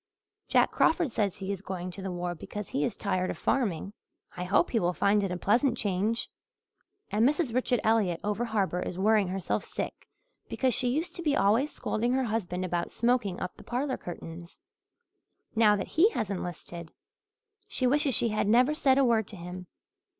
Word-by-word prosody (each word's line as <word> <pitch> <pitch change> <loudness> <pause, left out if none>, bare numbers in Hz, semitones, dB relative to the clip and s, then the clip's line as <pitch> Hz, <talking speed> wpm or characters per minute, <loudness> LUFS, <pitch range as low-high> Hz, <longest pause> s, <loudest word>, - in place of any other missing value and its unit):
Jack - - +3
Crawford 325 -4 +2
says 205 -3 -1
he 195 0 -4
is 195 -2 -4
going 185 -2 -5
to 195 - -9
the 190 - -4
war 175 0 -3
because 205 +4 -7
he 145 - -1
is - - -1
tired 185 -2 -1
of - - -4
farming. 200 -7 -1 0.4
I 180 - -4
hope 180 - +2
he 230 - +2
will 175 -1 +1
find 205 +1 +3
it 195 -2 -2
a 180 - -2
pleasant 235 - +2
change. 205 +4 0 0.8
And 210 +2 +2
Mrs. 285 -1 +2
Richard 250 0 +1
Elliott 215 -6 +2
over 210 +3 -1
harbour 200 -5 0
is 180 - -4
worrying 210 0 +3
herself 185 0 -2
sick - - -6 0.4
because 260 -2 +1
she 255 - +1
used 325 +7 -2
to - - -4
be 300 -4 +1
always 230 +9 +3
scolding 240 +3 -1
her 265 0 +2
husband 185 -5 -2
about 175 -1 -2
smoking 235 -6 0
up 180 - -5
the - - -14
parlour 260 +2 -2
curtains. 170 0 -9 1.0
Now 215 -2 +5
that 195 - -4
he 355 +8 +5
has 215 -4 -2
enlisted 175 -2 -6 0.8
she 255 - -1
wishes 275 0 +3
she 235 - +2
had 215 -1 0
never 250 +7 +4
said 270 -3 +3
a 275 - +5
word 225 -4 +2
to 215 - -9
him. 180 0 -8
210 Hz, 190 wpm, -29 LUFS, 180-245 Hz, 1.0 s, Now